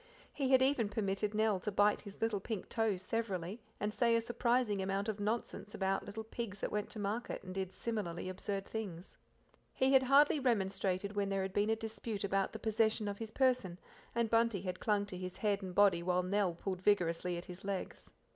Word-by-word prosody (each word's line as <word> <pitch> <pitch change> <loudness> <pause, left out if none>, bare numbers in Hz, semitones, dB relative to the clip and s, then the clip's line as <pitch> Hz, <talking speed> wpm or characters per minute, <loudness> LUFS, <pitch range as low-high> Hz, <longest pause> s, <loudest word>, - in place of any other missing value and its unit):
He 275 -3 0
had 260 -1 +6
eyen 260 -6 +2
permitted 205 0 -1
Nell 215 -3 +2
to 210 - -3
bite 205 +1 +3
his 200 +1 -7
little 225 -3 +1
pink 205 0 -4
toes 215 -5 0
severally, 200 -2 -2 0.2
and 210 0 -1
say 235 0 +3
a - - +4
surprising 235 -3 +1
amount 195 +2 -1
of 215 -1 -2
nonsense 210 -1 -2
about 195 0 0
little 215 +2 -5
pigs 220 -2 -5
that - - -2
went 210 0 -1
to - - -8
market 210 +3 -3
and 185 -1 -7
did 190 -1 -3
similarly 190 -4 -3
absurd 195 +1 -3
things. 195 -5 -5 0.6
He 265 +1 +3
had 265 - +8
hardly 280 +3 +5
remonstrated 200 -5 0
when 200 -1 0
there 195 -1 0
had 190 0 -4
been 205 +1 +2
a 225 - +3
dispute 220 -1 -4
about 195 -1 +1
the - - -5
possession 220 -1 +1
of 200 0 -4
his 225 -1 -4
person, 250 -8 +1 0.4
and 235 -1 +2
Bunty 225 -4 +2
had 185 -1 -3
clung 205 -2 +1
to 190 -3 -7
his 185 0 -5
head 205 -1 +1
and 185 -2 -6
body 195 -4 +5
while 180 +1 +1
Nell 190 -1 +1
pulled 185 +1 -4
vigorously 180 -3 +2
at 175 - -6
his 180 +1 -9
legs. 195 -1 -4
205 Hz, 205 wpm, -35 LUFS, 190-225 Hz, 0.6 s, had